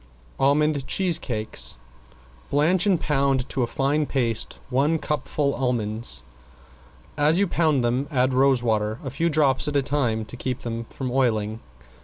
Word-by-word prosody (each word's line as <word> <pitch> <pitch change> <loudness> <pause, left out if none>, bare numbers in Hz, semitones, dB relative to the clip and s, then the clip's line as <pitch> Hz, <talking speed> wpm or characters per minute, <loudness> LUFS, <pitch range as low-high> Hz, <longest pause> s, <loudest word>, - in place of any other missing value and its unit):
~ALMOND 145 0 +2
CHEESE 185 -4 +2
CAKES~ 110 - -4 0.7
Blanch 170 +7 +2
and 185 -5 +3
pound 135 -3 +1
to 135 - -2
a 120 - +1
fine 145 +4 0
paste 115 -5 -1
one 145 +6 +2
cupful 150 -2 -1
almonds. 110 - -2 1.0
As 150 +3 +4
you 200 - +3
pound 155 -7 +1
them 125 +4 0
add 130 -3 +1
rose 130 -1 +3
water, 110 -1 0
a 135 - -5
few 165 +6 0
drops 145 -2 +2
at 150 - -2
a 140 - +3
time 125 -6 0
to 110 - -8
keep 125 0 -4
them 115 0 -4
from 130 -2 -5
oiling. 110 -4 0
135 Hz, 155 wpm, -24 LUFS, 120-150 Hz, 1.0 s, As